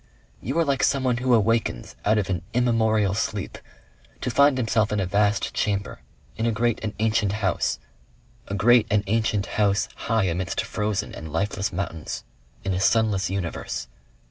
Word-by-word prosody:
You 135 Hz, +7 st, -3 dB
are 165 Hz, -, +3 dB
like 140 Hz, -2 st, +1 dB
someone 130 Hz, -3 st, +2 dB
who 125 Hz, 0 st, +3 dB
awakens 115 Hz, -, 0 dB
out 110 Hz, +1 st, +3 dB
of 100 Hz, -3 st, 0 dB
an 90 Hz, -3 st, -1 dB
immemorial 110 Hz, -5 st, +2 dB
sleep 105 Hz, -1 st, -3 dB, 0.6 s
to 125 Hz, -, -1 dB
find 140 Hz, +2 st, +4 dB
himself 115 Hz, -3 st, +1 dB
in 105 Hz, -, 0 dB
a 95 Hz, -, 0 dB
vast 100 Hz, +2 st, +1 dB
chamber, 100 Hz, -2 st, -1 dB, 0.4 s
in 115 Hz, +1 st, -1 dB
a -, -, +2 dB
great 115 Hz, +1 st, 0 dB
and 110 Hz, -1 st, -4 dB
ancient 110 Hz, -2 st, +1 dB
house, 95 Hz, -5 st, 0 dB, 0.7 s
a 100 Hz, -, -3 dB
great 115 Hz, +2 st, +5 dB
and 100 Hz, -1 st, +2 dB
ancient 110 Hz, -1 st, +1 dB
house 100 Hz, -1 st, +1 dB, 0.2 s
high 115 Hz, -2 st, +3 dB
amidst 90 Hz, -1 st, -1 dB
frozen 105 Hz, -1 st, -2 dB
and 80 Hz, -1 st, -8 dB
lifeless 100 Hz, +3 st, -1 dB
mountains 85 Hz, -4 st, -4 dB, 0.4 s
in 95 Hz, -, -1 dB
a 90 Hz, -, -1 dB
sunless 100 Hz, -2 st, +2 dB
universe. 85 Hz, -9 st, -4 dB
105 Hz, 165 wpm, -24 LUFS, 100-115 Hz, 0.7 s, great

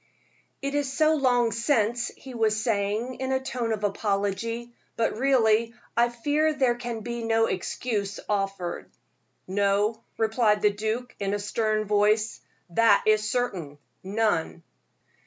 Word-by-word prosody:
"It 280 Hz, 0 st, -2 dB
is 290 Hz, -2 st, 0 dB
so 310 Hz, +3 st, +3 dB
long 245 Hz, -5 st, +2 dB
since," 230 Hz, 0 st, +1 dB
he 265 Hz, -, -10 dB
was 220 Hz, -2 st, +1 dB
saying, 220 Hz, +2 st, -1 dB
in 260 Hz, 0 st, -2 dB
a 265 Hz, -, +2 dB
tone 250 Hz, -3 st, -3 dB
of 215 Hz, -1 st, -2 dB
apology; 205 Hz, +3 st, -1 dB, 0.2 s
"but 230 Hz, -, 0 dB
really 230 Hz, -3 st, +3 dB, 0.2 s
I 240 Hz, +1 st, +4 dB
fear 295 Hz, +6 st, +1 dB
there 260 Hz, -4 st, +3 dB
can 240 Hz, -2 st, -5 dB
be 235 Hz, 0 st, -4 dB
no 225 Hz, 0 st, +3 dB
excuse 200 Hz, +1 st, -2 dB
offered." 195 Hz, -3 st, -2 dB, 0.6 s
"No," 205 Hz, +3 st, +1 dB, 0.2 s
replied 220 Hz, -1 st, +2 dB
the 210 Hz, -1 st, +4 dB
duke, 220 Hz, +4 st, -3 dB
in 200 Hz, 0 st, -1 dB
a -, -, -3 dB
stern 215 Hz, +1 st, 0 dB
voice, 210 Hz, +1 st, +2 dB, 0.3 s
"that 215 Hz, +2 st, +4 dB
is 215 Hz, 0 st, +3 dB
certain 185 Hz, -, -2 dB, 0.2 s
none." 195 Hz, -5 st, -1 dB
225 Hz, 140 wpm, -26 LUFS, 205-240 Hz, 0.6 s, I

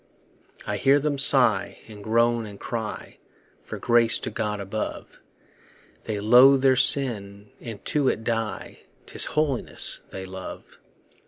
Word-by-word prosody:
I -, -, -3 dB
hear 140 Hz, +2 st, +3 dB
them 145 Hz, -1 st, -2 dB
sigh, 125 Hz, -7 st, +3 dB
and 105 Hz, -2 st, -12 dB
groan, 115 Hz, +1 st, +1 dB
and 100 Hz, -1 st, -12 dB
cry 110 Hz, -3 st, -6 dB, 0.4 s
For -, -, -8 dB
grace 120 Hz, -1 st, +3 dB
to -, -, -6 dB
God 105 Hz, -1 st, -3 dB
above; 100 Hz, +2 st, -6 dB, 0.9 s
They 105 Hz, -2 st, -4 dB
loathe 125 Hz, +5 st, +5 dB
their 130 Hz, -1 st, +4 dB
sin, 105 Hz, -7 st, 0 dB
and 115 Hz, -4 st, -9 dB
to 145 Hz, -3 st, 0 dB
it 110 Hz, -, -1 dB
die; 115 Hz, -3 st, -4 dB, 0.3 s
'Tis -, -, -3 dB
holiness 150 Hz, -5 st, 0 dB
they 95 Hz, -1 st, -8 dB
love. 95 Hz, 0 st, -10 dB
115 Hz, 135 wpm, -24 LUFS, 105-130 Hz, 0.9 s, loathe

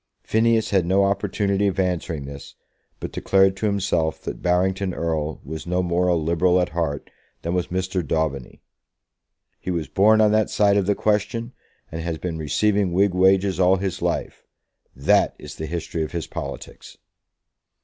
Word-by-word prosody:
Phineas 110 Hz, 0 st, +2 dB
had 95 Hz, -3 st, +3 dB
no 95 Hz, +2 st, +3 dB
opportunity 100 Hz, 0 st, 0 dB
of 95 Hz, -, -2 dB
answering 90 Hz, -5 st, -1 dB
this, 70 Hz, 0 st, -10 dB, 0.4 s
but -, -, -6 dB
declared 95 Hz, 0 st, +3 dB
to 105 Hz, -, 0 dB
himself 95 Hz, -6 st, 0 dB
that -, -, -6 dB
Barrington 95 Hz, +1 st, 0 dB
Erle 80 Hz, -2 st, -2 dB
was 80 Hz, +3 st, -7 dB
no 90 Hz, +1 st, 0 dB
more 90 Hz, +1 st, +1 dB
a 90 Hz, -, +3 dB
Liberal 85 Hz, +3 st, +2 dB
at 90 Hz, -, 0 dB
heart 75 Hz, -3 st, -3 dB, 0.3 s
than 85 Hz, -, -2 dB
was 90 Hz, -1 st, 0 dB
Mr. 95 Hz, 0 st, -2 dB
Daubeny. 75 Hz, -4 st, -2 dB, 1.0 s
"He -, -, -6 dB
was 85 Hz, -4 st, -2 dB
born 110 Hz, +3 st, +4 dB
on 105 Hz, -1 st, +5 dB
that 110 Hz, 0 st, +2 dB
side 100 Hz, -1 st, +3 dB
of 100 Hz, -2 st, +1 dB
the 105 Hz, -, +2 dB
question, 115 Hz, +4 st, -1 dB, 0.4 s
and 80 Hz, -, -5 dB
has 80 Hz, -1 st, -3 dB
been 85 Hz, -1 st, -4 dB
receiving 95 Hz, +6 st, +1 dB
Whig 100 Hz, +1 st, +3 dB
wages 95 Hz, +1 st, +3 dB
all 90 Hz, +1 st, +5 dB
his 95 Hz, -1 st, -3 dB
life. -, -, -2 dB, 0.5 s
That 70 Hz, +2 st, +2 dB
is -, -, -10 dB
the 80 Hz, -, -5 dB
history 85 Hz, 0 st, -4 dB
of 80 Hz, -, -4 dB
his 85 Hz, -3 st, -3 dB
politics!" -, -, -8 dB
90 Hz, 170 wpm, -23 LUFS, 80-100 Hz, 1.0 s, on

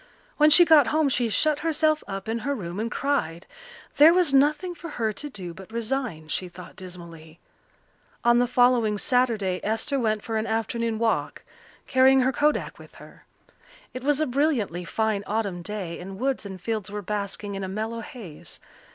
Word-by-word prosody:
When 300 Hz, 0 st, +6 dB
she 345 Hz, +4 st, +7 dB
got 305 Hz, -6 st, +6 dB
home 305 Hz, +2 st, +2 dB
she 245 Hz, -3 st, 0 dB
shut 300 Hz, +6 st, +2 dB
herself 310 Hz, -1 st, +1 dB
up 195 Hz, 0 st, -6 dB
in 225 Hz, +1 st, -1 dB
her 280 Hz, +5 st, -2 dB
room 180 Hz, -4 st, -6 dB
and 225 Hz, +2 st, -2 dB
cried. 210 Hz, -, -2 dB, 0.5 s
There 315 Hz, +4 st, +8 dB
was 350 Hz, -6 st, +2 dB
nothing 300 Hz, +6 st, +3 dB
for 335 Hz, -1 st, -9 dB
her 225 Hz, -7 st, -2 dB
to 295 Hz, +8 st, -7 dB
do 185 Hz, -9 st, -8 dB
but 190 Hz, +4 st, -13 dB
resign, 230 Hz, -, -3 dB
she 180 Hz, +3 st, -3 dB
thought 175 Hz, 0 st, -12 dB
dismally. 170 Hz, -3 st, -11 dB, 0.8 s
On 240 Hz, 0 st, +5 dB
the 245 Hz, -, +2 dB
following 245 Hz, -4 st, +3 dB
Saturday 220 Hz, -6 st, +1 dB
Esther 225 Hz, +6 st, -1 dB
went 215 Hz, -3 st, 0 dB
for 225 Hz, -1 st, -2 dB
an 220 Hz, +1 st, -2 dB
afternoon 225 Hz, 0 st, -1 dB
walk, 225 Hz, 0 st, -1 dB, 0.4 s
carrying 265 Hz, +1 st, +5 dB
her 260 Hz, +1 st, +1 dB
kodak 295 Hz, +3 st, 0 dB
with -, -, -15 dB
her. -, -, -15 dB, 0.7 s
It 255 Hz, -, -7 dB
was 290 Hz, +1 st, +2 dB
a 310 Hz, -, +2 dB
brilliantly 245 Hz, -, 0 dB
fine 215 Hz, +2 st, -1 dB
autumn 200 Hz, -4 st, -2 dB
day, 175 Hz, -2 st, -5 dB
and 190 Hz, +2 st, -8 dB
woods 260 Hz, -2 st, -2 dB
and 190 Hz, -1 st, -8 dB
fields 215 Hz, +1 st, -3 dB
were 205 Hz, 0 st, -5 dB
basking 200 Hz, 0 st, -4 dB
in 195 Hz, 0 st, -4 dB
a -, -, -3 dB
mellow 220 Hz, +4 st, -4 dB
haze. 210 Hz, -, -10 dB
225 Hz, 180 wpm, -25 LUFS, 195-270 Hz, 0.8 s, There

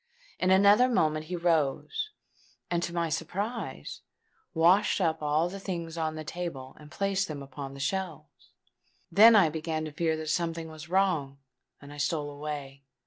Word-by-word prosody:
In 185 Hz, -, +1 dB
another 200 Hz, +6 st, +6 dB
moment 155 Hz, -9 st, +1 dB
he 180 Hz, +3 st, -4 dB
rose, 170 Hz, -, 0 dB, 0.6 s
and 170 Hz, -1 st, +1 dB
to 175 Hz, -, -3 dB
my 170 Hz, -1 st, -1 dB
surprise 190 Hz, -, -4 dB, 0.5 s
washed 175 Hz, +7 st, +4 dB
up 160 Hz, -4 st, 0 dB
all 150 Hz, +3 st, +1 dB
the 195 Hz, +3 st, -7 dB
things 170 Hz, -4 st, -5 dB
on 160 Hz, -1 st, -2 dB
the 155 Hz, -, -5 dB
table 155 Hz, -6 st, -6 dB
and 150 Hz, -1 st, -13 dB
placed 195 Hz, +2 st, -1 dB
them 145 Hz, -3 st, -6 dB
upon 135 Hz, 0 st, -8 dB
the -, -, -10 dB
shelves. 190 Hz, +6 st, -4 dB, 0.6 s
Then 225 Hz, +2 st, +8 dB
I 190 Hz, -6 st, +6 dB
began 160 Hz, 0 st, -3 dB
to 155 Hz, -, -6 dB
fear 160 Hz, +1 st, 0 dB
that 155 Hz, -1 st, -5 dB
something 165 Hz, -1 st, -2 dB
was 155 Hz, 0 st, -10 dB
wrong; 170 Hz, -8 st, +1 dB, 0.4 s
and 145 Hz, 0 st, -12 dB
I -, -, -11 dB
stole 145 Hz, 0 st, -1 dB
away. 145 Hz, -2 st, -6 dB
165 Hz, 165 wpm, -29 LUFS, 150-185 Hz, 0.6 s, Then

